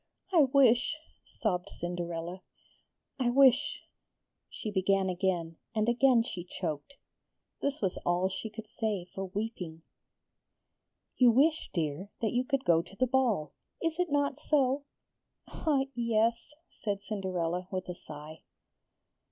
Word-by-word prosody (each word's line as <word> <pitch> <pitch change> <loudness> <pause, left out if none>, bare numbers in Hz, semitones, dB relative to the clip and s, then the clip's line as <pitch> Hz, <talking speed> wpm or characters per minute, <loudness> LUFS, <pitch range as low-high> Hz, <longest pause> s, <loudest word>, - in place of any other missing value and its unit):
'I 320 -5 +7
wish,' 260 +1 +4 0.3
sobbed 190 -6 -2
Cinderella. 175 0 -4 0.8
'I 250 -2 +2
wish,' 270 +3 +4 0.7
she 215 - -5
began 190 0 +2
again, 175 -3 -1 0.2
and 215 0 +2
again 240 0 +5
she 180 -7 -6
choked. 170 - -5 0.7
This 280 +1 -1
was 190 - 0
all 175 +1 +1
she 190 +4 -5
could 215 0 -9
say 210 -5 0
for 195 - -3
weeping. 185 -5 -5 1.3
'You 250 -2 +7
wish, 300 +7 +3
dear, 165 +3 -2
that 220 - 0
you 245 +1 +2
could 275 0 -1
go 165 -1 +5
to 185 - -15
the 255 - +2
ball; 240 - +1 0.3
is 330 0 -1
it 360 -1 +1
not 285 -1 +1
so?' 280 -2 +2 0.6
'Ah, 290 -4 +1
yes!' 230 0 +1 0.2
said 200 -2 -3
Cinderella 185 -4 -2
with 185 -1 -3
a 180 - -3
sigh. 155 -1 -10
215 Hz, 130 wpm, -31 LUFS, 180-255 Hz, 1.3 s, I